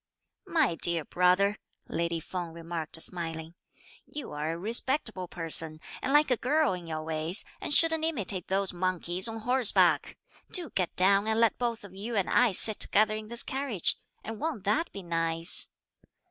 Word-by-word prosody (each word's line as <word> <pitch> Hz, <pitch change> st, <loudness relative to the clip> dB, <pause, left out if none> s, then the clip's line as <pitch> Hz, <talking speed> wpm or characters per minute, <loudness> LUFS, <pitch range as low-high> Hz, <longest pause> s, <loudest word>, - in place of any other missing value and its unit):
"My 310 Hz, -, +2 dB
dear 165 Hz, -2 st, 0 dB
brother," 185 Hz, +3 st, +2 dB, 0.3 s
lady 170 Hz, 0 st, -2 dB
Feng 170 Hz, 0 st, -6 dB
remarked 165 Hz, -1 st, -6 dB
smiling, 165 Hz, -1 st, -5 dB, 0.5 s
"you 295 Hz, -, -7 dB
are 150 Hz, +2 st, -3 dB
a -, -, -6 dB
respectable 220 Hz, -, -1 dB
person, 165 Hz, -2 st, -1 dB, 0.2 s
and 260 Hz, -, -2 dB
like 295 Hz, -1 st, +3 dB
a 250 Hz, -, +3 dB
girl 300 Hz, +1 st, +1 dB
in 175 Hz, -2 st, -7 dB
your 155 Hz, -1 st, -5 dB
ways, 160 Hz, +4 st, -1 dB, 0.2 s
and -, -, -4 dB
shouldn't 320 Hz, +1 st, +7 dB
imitate 210 Hz, -, -1 dB
those 195 Hz, 0 st, +1 dB
monkeys 180 Hz, +1 st, -1 dB
on 225 Hz, 0 st, -5 dB
horseback! 245 Hz, 0 st, +2 dB, 0.3 s
do 350 Hz, -4 st, +3 dB
get 185 Hz, -3 st, -2 dB
down 195 Hz, +3 st, +3 dB
and 220 Hz, 0 st, 0 dB
let 230 Hz, -1 st, +2 dB
both 235 Hz, -3 st, -3 dB
you 210 Hz, +5 st, -6 dB
and 195 Hz, -3 st, -1 dB
I 245 Hz, -3 st, +4 dB
sit 210 Hz, +3 st, +6 dB
together 215 Hz, +1 st, +3 dB
in 215 Hz, 0 st, -7 dB
this 235 Hz, +1 st, -2 dB
carriage; 265 Hz, -, -1 dB, 0.3 s
and 220 Hz, 0 st, -7 dB
won't 305 Hz, -, -4 dB
that 295 Hz, +12 st, 0 dB
be 200 Hz, -, -9 dB
nice?" 165 Hz, 0 st, +1 dB
195 Hz, 165 wpm, -28 LUFS, 170-235 Hz, 0.5 s, shouldn't